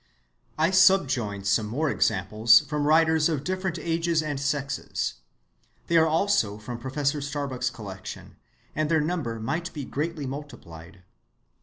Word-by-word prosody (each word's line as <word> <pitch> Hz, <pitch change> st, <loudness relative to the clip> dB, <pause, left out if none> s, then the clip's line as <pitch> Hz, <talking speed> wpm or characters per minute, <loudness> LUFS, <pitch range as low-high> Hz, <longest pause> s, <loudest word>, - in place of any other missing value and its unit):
I 160 Hz, +3 st, +2 dB
subjoin 130 Hz, -, +3 dB
some 105 Hz, +2 st, +1 dB
more 145 Hz, +7 st, -1 dB
examples 110 Hz, +3 st, +4 dB
from 150 Hz, 0 st, -2 dB
writers 160 Hz, 0 st, +4 dB
of 150 Hz, -4 st, -2 dB
different 185 Hz, +1 st, -2 dB
ages 165 Hz, 0 st, 0 dB
and 145 Hz, -3 st, -3 dB
sexes. 140 Hz, -1 st, -2 dB, 0.7 s
They 170 Hz, -, -1 dB
are 160 Hz, 0 st, +5 dB
also 160 Hz, -, +1 dB
from 115 Hz, +3 st, -7 dB
Professor 140 Hz, +3 st, -1 dB
Starbuck's 140 Hz, -3 st, -3 dB
collection, 100 Hz, -6 st, -9 dB, 0.4 s
and 155 Hz, 0 st, 0 dB
their 160 Hz, -1 st, +3 dB
number 150 Hz, -8 st, -2 dB
might 160 Hz, +10 st, -3 dB
be 145 Hz, -4 st, -5 dB
greatly 155 Hz, +1 st, -3 dB
multiplied. 95 Hz, -, -9 dB
145 Hz, 135 wpm, -26 LUFS, 115-160 Hz, 0.7 s, are